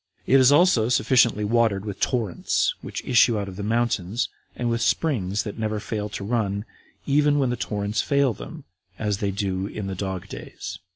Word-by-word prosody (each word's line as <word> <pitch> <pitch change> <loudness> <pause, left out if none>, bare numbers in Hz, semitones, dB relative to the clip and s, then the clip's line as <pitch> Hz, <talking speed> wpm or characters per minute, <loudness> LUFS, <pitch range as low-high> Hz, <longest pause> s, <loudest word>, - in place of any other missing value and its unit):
It 135 - +5
is 130 +1 +6
also 145 -8 +4
sufficiently 120 -3 +3
watered 110 -3 +1
with 100 -2 -6
torrents, 115 -8 0
which - - -6
issue 120 -2 +4
out 100 -1 -3
of 95 - -8
the 100 - -6
mountains, 110 -1 0 0.3
and 120 - -2
with 115 0 0
springs 110 - 0
that 105 0 -7
never 110 -1 -1
fail 105 -1 -4
to 100 - -6
run, 105 -2 -1 0.4
even 145 +1 +3
when 135 -3 +1
the - - 0
torrents 105 -2 -2
fail 140 -3 +2
them, - - -10 0.3
as 105 -2 -1
they 100 - 0
do 95 -1 -2
in 105 -1 -6
the 95 - -3
dog 95 -1 -4
days. - - -8
110 Hz, 185 wpm, -24 LUFS, 100-120 Hz, 0.4 s, is